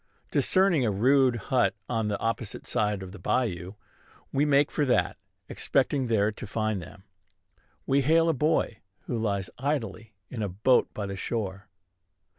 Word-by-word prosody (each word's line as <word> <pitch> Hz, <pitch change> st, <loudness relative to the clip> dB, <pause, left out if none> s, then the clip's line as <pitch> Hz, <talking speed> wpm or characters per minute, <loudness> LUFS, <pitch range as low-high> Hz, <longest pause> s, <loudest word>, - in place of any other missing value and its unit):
Discerning 185 Hz, -7 st, +3 dB
a 115 Hz, -, +2 dB
rude 130 Hz, +5 st, +3 dB
hut 120 Hz, +3 st, +1 dB
on 115 Hz, -3 st, -1 dB
the 105 Hz, -1 st, -1 dB
opposite 115 Hz, -1 st, -3 dB
side 105 Hz, -4 st, 0 dB
of 95 Hz, -, -8 dB
the 105 Hz, -, -11 dB
bayou, 95 Hz, -3 st, -1 dB, 0.6 s
we 140 Hz, +2 st, +2 dB
make 145 Hz, 0 st, +3 dB
for 150 Hz, -, 0 dB
that, 130 Hz, -3 st, +2 dB, 0.3 s
expecting 135 Hz, -1 st, 0 dB
there 110 Hz, -2 st, +2 dB
to 105 Hz, -, -9 dB
find 110 Hz, -2 st, -1 dB
them. 95 Hz, +4 st, -12 dB, 0.8 s
We 140 Hz, +1 st, +3 dB
hail 165 Hz, +4 st, +4 dB
a 165 Hz, -, +3 dB
boy 150 Hz, -6 st, 0 dB, 0.2 s
who -, -, -4 dB
lies 100 Hz, -5 st, -1 dB
idly 115 Hz, -6 st, -3 dB, 0.2 s
in 120 Hz, -, -4 dB
a 105 Hz, -, -1 dB
boat 110 Hz, +8 st, +2 dB
by 105 Hz, -, -3 dB
the 100 Hz, -1 st, -5 dB
shore. 100 Hz, -2 st, -4 dB
115 Hz, 160 wpm, -27 LUFS, 100-135 Hz, 0.8 s, hail